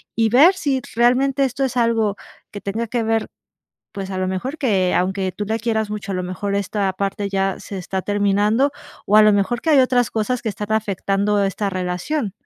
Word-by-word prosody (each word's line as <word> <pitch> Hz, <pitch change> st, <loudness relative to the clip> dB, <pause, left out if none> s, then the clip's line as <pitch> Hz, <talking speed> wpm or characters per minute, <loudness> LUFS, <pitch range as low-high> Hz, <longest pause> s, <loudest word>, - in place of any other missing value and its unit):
y 225 Hz, -1 st, +2 dB
ver 290 Hz, -, +6 dB
si 270 Hz, -6 st, -1 dB
realmente 255 Hz, +3 st, +3 dB
esto 270 Hz, +1 st, 0 dB
es 255 Hz, -1 st, -4 dB
algo 230 Hz, -4 st, +1 dB, 0.3 s
que 205 Hz, -, -8 dB
tenga 225 Hz, +4 st, -3 dB
que 235 Hz, +1 st, -1 dB
ver, 225 Hz, 0 st, 0 dB, 0.6 s
pues, 195 Hz, -1 st, -6 dB
a 185 Hz, -, -3 dB
lo 185 Hz, -, -1 dB
mejor, 250 Hz, +12 st, -4 dB
que 195 Hz, -9 st, +1 dB
aunque 190 Hz, +1 st, 0 dB
tú 210 Hz, -, -4 dB
la 220 Hz, +2 st, -1 dB
quieras 220 Hz, -2 st, -1 dB
mucho, 210 Hz, -2 st, -4 dB
a -, -, -2 dB
lo 185 Hz, -, -2 dB
mejor 185 Hz, +3 st, -3 dB
esta 200 Hz, -1 st, -1 dB
parte 200 Hz, +1 st, -3 dB
ya 195 Hz, -1 st, -1 dB
se 200 Hz, -, -7 dB
está 190 Hz, +1 st, -3 dB
terminando, 205 Hz, +6 st, +2 dB, 0.4 s
o, 210 Hz, -, +4 dB
a 215 Hz, -, +8 dB
lo 215 Hz, 0 st, +6 dB
mejor, 205 Hz, +4 st, 0 dB
que 325 Hz, -, 0 dB
hay 285 Hz, -3 st, +6 dB
otras 250 Hz, -2 st, +2 dB
cosas 235 Hz, +3 st, -1 dB
que 225 Hz, -, -3 dB
están 205 Hz, +1 st, -5 dB
afectando 205 Hz, -1 st, 0 dB
esta 195 Hz, +1 st, -1 dB
relación. 185 Hz, -, -2 dB
210 Hz, 205 wpm, -20 LUFS, 195-240 Hz, 0.6 s, a